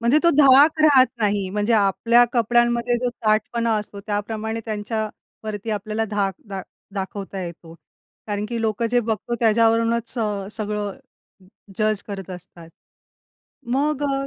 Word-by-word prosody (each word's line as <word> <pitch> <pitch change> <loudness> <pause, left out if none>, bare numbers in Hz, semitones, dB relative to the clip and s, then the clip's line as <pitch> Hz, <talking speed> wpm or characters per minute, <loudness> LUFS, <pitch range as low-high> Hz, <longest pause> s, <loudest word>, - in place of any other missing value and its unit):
म्हणजे 235 +6 +4
तो 340 - +5
धाक 290 +3 +7
राहत 275 -4 +6
नाही. 200 -2 0
म्हणजे 210 +3 0
आपल्या 230 +3 +4
कपड्यांमध्ये 240 0 +2
जो 250 - -1 0.2
ताठपणा 225 +2 +1
असतो 205 -1 -8
त्याप्रमाणे 220 +2 -3
त्यांच्यावरती 215 0 -5
आपल्याला 215 +1 -2
धाक 200 -2 0
दा 195 -1 -4 0.3
दाखवता 195 0 -5
येतो, 170 -1 -9 0.5
कारण 205 -1 -2
की 235 -1 -3
लोकं 220 +1 0
जे 245 - +3
बघतो 225 +1 -3
त्याच्यावरूनच 230 +1 +2
स - - -6 0.4
सगळं 210 -2 -3 0.8
जज 215 -1 0
करत 195 -2 -7
असतात. 180 -2 -11 1.0
मग 290 +2 0
अ, 275 -1 -1
220 Hz, 130 wpm, -22 LUFS, 205-240 Hz, 1.0 s, धाक